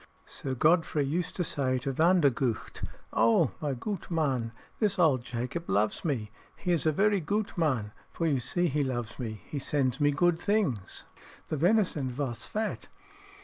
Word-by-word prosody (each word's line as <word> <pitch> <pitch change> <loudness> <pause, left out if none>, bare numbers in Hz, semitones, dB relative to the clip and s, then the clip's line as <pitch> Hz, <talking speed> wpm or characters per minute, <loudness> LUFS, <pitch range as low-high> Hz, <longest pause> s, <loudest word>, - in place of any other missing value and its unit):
Sir 130 -1 -3
Godfrey 155 +1 +3
used 170 +5 -2
to 180 - 0
say 130 -5 0
to 135 +2 -2
Vandergucht, 140 -8 +2 0.3
"Oh, 115 +1 +4
my 145 -3 -1
goot 195 - -5
man, 135 -9 0 0.3
this 205 -3 +1
old 155 -8 +4
Jacob 125 +9 -4
loves 105 +1 +1
me. 120 -10 -2 0.2
He 180 - -2
is 165 -2 +2
a - - +5
very 200 +5 +3
goot 205 +6 -2
man, 130 -11 0 0.2
for 165 - -3
you 145 -5 +2
see 175 +8 0
he 150 -1 0
loves 120 -4 -3
me, 110 -4 -5
he 145 - -4
sends 135 -1 0
me 145 - +5
goot 165 +3 +2
things. 180 - 0 0.5
The 155 - -1
venison 170 -5 +2
vos 125 -2 -4
fat." 215 0 -3
145 Hz, 165 wpm, -29 LUFS, 125-175 Hz, 0.5 s, a